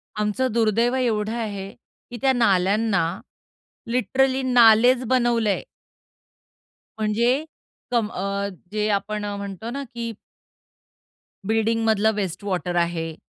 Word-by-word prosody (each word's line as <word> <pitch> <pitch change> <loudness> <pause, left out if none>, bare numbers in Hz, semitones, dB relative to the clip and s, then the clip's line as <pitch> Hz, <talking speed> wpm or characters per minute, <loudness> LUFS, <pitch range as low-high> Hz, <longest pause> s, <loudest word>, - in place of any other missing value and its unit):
आमचं 210 +5 0
दुर्दैव 230 +2 +2
एवढं 220 -4 0
आहे, 205 -4 -4 0.4
की 240 - -6
त्या 270 -1 +3
नाल्यांना 200 -3 +2 0.9
लिटरली 260 +3 +1
नालेचं 245 0 +5
बनवलं 240 -3 +2
आहे. 205 - -1 1.3
म्हणजे 235 +6 +1 0.5
कम 235 -3 +1
अ, 200 +1 -2 0.2
जे 210 0 -1
आपण 210 +1 -1
म्हणतो 200 +2 -6
ना 280 +3 -4
की 235 -1 -4 1.4
बिल्डिंगमधलं 220 -1 +2
वेस्ट 190 +1 -4
वॉटर 180 -3 -2
आहे. 170 -2 -1
220 Hz, 105 wpm, -23 LUFS, 200-240 Hz, 1.4 s, नालेचं